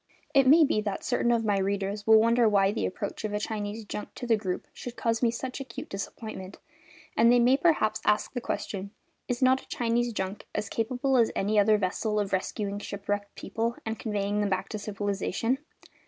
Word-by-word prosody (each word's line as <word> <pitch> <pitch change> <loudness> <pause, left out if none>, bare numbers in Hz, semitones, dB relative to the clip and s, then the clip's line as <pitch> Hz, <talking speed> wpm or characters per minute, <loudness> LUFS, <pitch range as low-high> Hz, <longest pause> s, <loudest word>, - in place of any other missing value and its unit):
It 270 -2 +5
may 315 +4 +8
be 215 - +1
that 205 -2 -3
certain 240 -1 +1
of 230 -1 +1
my 205 -2 +2
readers 200 +1 -2
will 220 0 +8
wonder 230 0 +4
why 195 -1 +3
the 220 - -1
approach 200 +3 -5
of 215 -1 -2
a 210 - 0
Chinese 210 0 -4
junk 210 - -6
to - - -6
the 235 -2 +4
group 190 -4 -3
should 245 -1 -8
cause 230 -1 0
me 240 - +4
such 255 +3 -4
acute 265 -3 -7
disappointment, 195 -1 -6 0.6
and 230 +1 +5
they 245 - +6
may 245 +2 +5
perhaps 270 -8 +2
ask 210 0 +1
the 245 - -3
question: 200 -4 -4 0.4
"Is 245 +1 -1
not 260 +1 +4
a - - -19
Chinese 240 0 0
junk 190 -1 -4
as 210 - -2
capable 255 +3 0
as 230 -2 +4
any 210 +2 +2
other 210 +1 +5
vessel 210 +2 -1
of 200 -2 -2
rescuing 200 +1 -2
shipwrecked 200 0 -4
people 230 +1 -2
and 225 0 -3
conveying 205 -1 -1
them 205 - +1
back 190 0 -1
to 215 - -4
civilisation?" 205 +4 -1
215 Hz, 200 wpm, -28 LUFS, 200-235 Hz, 0.6 s, may